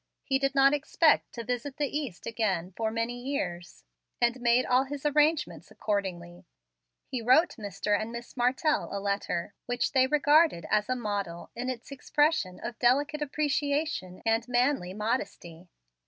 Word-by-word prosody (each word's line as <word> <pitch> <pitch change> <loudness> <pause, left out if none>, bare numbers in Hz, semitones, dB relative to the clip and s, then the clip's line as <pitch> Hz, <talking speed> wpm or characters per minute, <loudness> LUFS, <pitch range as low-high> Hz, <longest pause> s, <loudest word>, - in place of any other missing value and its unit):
He 270 -1 +1
did 275 0 0
not 275 +1 +6
expect 305 +2 +2
to 235 - -5
visit 250 +4 -4
the 290 -2 -2
East 275 - -4
again 195 -6 -1
for 225 -1 -1
many 230 +2 -3
years, 180 -10 -4 0.4
and 240 +1 +1
made 240 +1 +3
all 255 +2 +3
his 285 +1 -7
arrangements 300 +1 +1
accordingly. 180 -4 -4 0.6
He 255 - -4
wrote 260 +9 +4
Mr. 205 0 -1
and 220 +1 -5
Miss 235 0 -8
Martell 265 +6 +1
a 200 - -3
letter, 200 -3 -2
which 245 0 0
they 260 -2 +4
regarded 300 - +4
as 210 +2 +2
a 255 - +1
model 205 -7 -4
in 250 +2 -3
its 250 +1 -6
expression 275 - 0
of 235 -2 -6
delicate 285 +5 +2
appreciation 290 - -1
and 225 +1 +1
manly 245 -7 +1
modesty. 185 -6 -4
245 Hz, 155 wpm, -28 LUFS, 205-280 Hz, 0.6 s, not